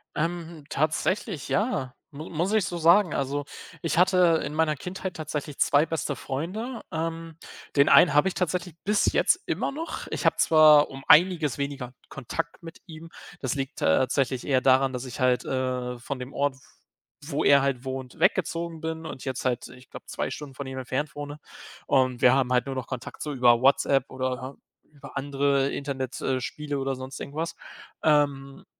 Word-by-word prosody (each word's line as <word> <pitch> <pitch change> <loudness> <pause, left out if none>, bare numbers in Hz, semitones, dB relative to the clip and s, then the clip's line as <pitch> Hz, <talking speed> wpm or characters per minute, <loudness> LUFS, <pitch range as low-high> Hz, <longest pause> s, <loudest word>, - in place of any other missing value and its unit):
Ähm, 165 -1 -3
tatsächlich, 155 - -1
ja, 190 - -1 0.2
mu 150 +4 -8
muss 170 +4 -1
ich 215 -3 +2
so 175 - -4
sagen. 170 +2 +5
Also, 140 +1 -2 0.4
ich 165 - -1
hatte 180 -2 +4
in - - -5
meiner 155 -1 +1
Kindheit 180 +5 -6
tatsächlich 150 -2 -5
2 145 +2 +4
beste 160 -3 -3
Freunde. 205 - -4
Ähm, 165 0 -4 0.4
den 140 - +6
einen 175 - +7
habe 150 +5 +4
ich 190 - -1
tatsächlich 180 -1 -2
bis 210 +1 +2
jetzt - - +3
immer - - -1
noch. 320 +4 -6
Ich - - -3
habe - - +4
zwar 155 -2 +6
um 135 0 -10
einiges 160 -4 +5
weniger 140 -3 -4 0.2
Kontakt 165 +7 -5
mit 165 -1 -11
ihm, 165 0 -10 0.3
das 155 - -2
liegt 135 +1 -4
tatsächlich 130 - +1
eher 130 -2 +3
daran, 130 +1 +4
dass 125 0 -5
ich 125 - -7
halt, 125 -1 +2
äh, 125 -1 -2
von 130 +2 -6
dem 125 +2 -8
Ort, 140 -1 0
w - - -20 0.7
wo 145 -1 -2
er 140 -1 +6
halt 135 -2 -1
wohnt, 130 -1 -6
weggezogen 170 -2 0
bin 160 0 -4
und 135 - -7
jetzt 130 -1 -4
halt, 125 -1 -1
ich 125 +1 -16
glaube - - -11
2 - - -3
Stunden 145 -3 -8
von 140 - -6
ihm 130 0 -6
entfernt 130 +2 -3
wohne. 145 0 -7 0.5
Und 130 -2 +2
wir 125 - +7
haben 130 -2 +1
halt 125 -1 +2
nur 135 - -4
noch 130 -1 -4
Kontakt 130 -2 -7
so 150 - -3
über 120 -3 +4
WhatsApp 135 0 +3
oder, 130 +1 -4 0.4
äh, - - -33
über - - -12
andere 140 0 +1
Internet, 135 -2 -4
äh, 130 -1 -1
Spiele 145 +1 -4
oder 135 0 -2
sonst 130 +1 -8
irgendwas. 160 +4 -4 0.5
Ähm, 140 -3 +1
145 Hz, 185 wpm, -26 LUFS, 130-165 Hz, 0.7 s, einen